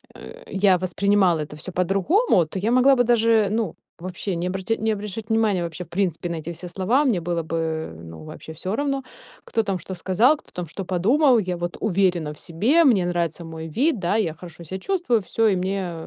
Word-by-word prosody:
э, - - -11
я 195 -1 +3
воспринимала 185 -1 +2
это 150 0 -7
всё 150 +5 -7
по-другому, 195 - +2
то 175 +5 -6
я 215 +5 0
могла 255 +2 +5
бы 245 - +3
даже, 225 -3 +3
ну, 220 -5 -1 0.2
вообще 185 +1 -4
не 175 +2 -2
обрат 190 +2 -5
не 220 0 +1
обращать 210 +1 -6
внимания, 220 -5 +2
вообще, 170 +1 -5
в - - -27
принципе, 180 -2 -1
на 170 - -3
эти 160 +2 -6
все 175 +2 -6
слова. 195 - +1
Мне 230 -9 +2
было 170 0 -2
бы, 165 +1 -3
э, 160 - -3
ну, 80 -1 -10
вообще 160 - -10
всё 185 +6 -4
равно, 275 0 -1 0.4
кто 225 - 0
там 195 -3 -1
что 180 +3 -7
сказал, 205 - +3
кто - - -21
там 180 - -5
что 195 +5 -6
подумал. 235 - +3
Я 180 -3 -2
вот 175 0 -4
уверена 180 -6 +1
в 150 - -12
себе. 225 - +2
Мне 215 -9 +4
нравится 170 -1 -2
мой 160 0 -7
вид, 250 - +1
да, 180 +3 0
я 175 -8 0
хорошо 170 +1 -12
себя 185 +4 -6
чувствую, 330 - 0
всё, 225 +4 +1
и 200 - +3
мне 185 -1 -2
185 Hz, 215 wpm, -23 LUFS, 170-220 Hz, 0.4 s, могла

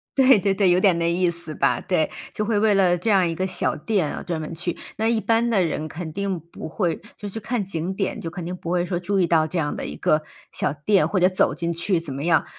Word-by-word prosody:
对 265 -5 +6
对 195 0 +1
对， 195 -2 +3
有 175 +1 +4
点 185 -3 +4
那 170 0 +1
意 175 0 +2
思 170 -2 0
吧。 140 - +1
对， 160 -4 0 0.2
就 215 - -2
会 220 -2 +1
为 215 -1 +3
了 185 -3 +3
这 220 +6 -2
样 190 -4 +4
一 165 - -2
个 185 - -1
小 185 - 0
店 175 0 -1
啊 - - -6
专 170 -3 -3
门 155 - -6
去。 175 +1 -3 0.2
那 220 +1 +1
一 230 -2 +1
般 230 +1 +2
的 195 -5 +3
人 155 -1 -2
肯 160 0 -6
定 195 -2 -2
不 170 0 -10
会 170 0 -1 0.2
就 205 0 -7
去 225 - -6
看 225 0 -2
景 185 0 -4
点， 195 - -2
就 165 - -5
肯 170 0 -7
定 180 +1 -4
不 175 -1 -6
会 180 0 +1
说 175 -1 -2
注 195 +2 -1
意 175 - +3
到 160 -2 +3
这 175 +3 -4
样 145 -2 -1
的 - - -5
一 - - -6
个 155 0 +1 0.3
小 140 - -1
店， 185 +7 +2
或 190 - 0
者 180 +1 +5
走 185 - +2
进 170 0 -2
去 170 +1 0
怎 150 -5 -5
么 140 +2 -5
样。 170 -1 +3
180 Hz, 295 characters per minute, -23 LUFS, 165-200 Hz, 0.3 s, 对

